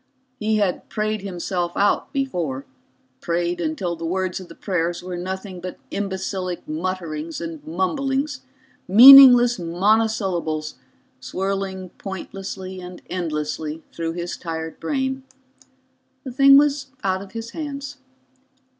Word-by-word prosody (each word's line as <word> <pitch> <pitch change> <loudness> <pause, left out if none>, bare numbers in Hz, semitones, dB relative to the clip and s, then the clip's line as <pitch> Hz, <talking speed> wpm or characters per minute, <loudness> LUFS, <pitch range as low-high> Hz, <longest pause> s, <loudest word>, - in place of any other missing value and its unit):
He 215 0 +1
had 200 -4 -1
prayed 215 0 -2
himself 175 -2 -3
out 205 +1 +1
before, 175 - -2 0.5
prayed 175 +1 -1
until 260 - -2
the 165 - -9
words 185 +2 -1
of 185 - -10
the 165 - -13
prayers 175 -2 -2
were 180 0 -5
nothing 185 +1 -6
but 185 0 -6
imbecilic 190 -2 -3
mutterings 165 -1 -4
and 165 -3 -6
mumblings, 270 - -1 0.5
meaningless 245 +2 +10
monosyllables 180 -4 0 0.5
swirling 190 -1 -3
pointlessly 190 -1 -7
and 180 0 -10
endlessly 155 -2 -3
through 165 -1 -3
his 175 0 -5
tired 160 -1 -6
brain. 265 -1 -2 1.0
The 260 - -6
thing 275 +2 +7
was 285 -1 +2 0.2
out 190 -1 0
of 195 - -12
his 230 0 -6
hands. 285 -2 -6
190 Hz, 120 wpm, -22 LUFS, 170-225 Hz, 1.0 s, meaningless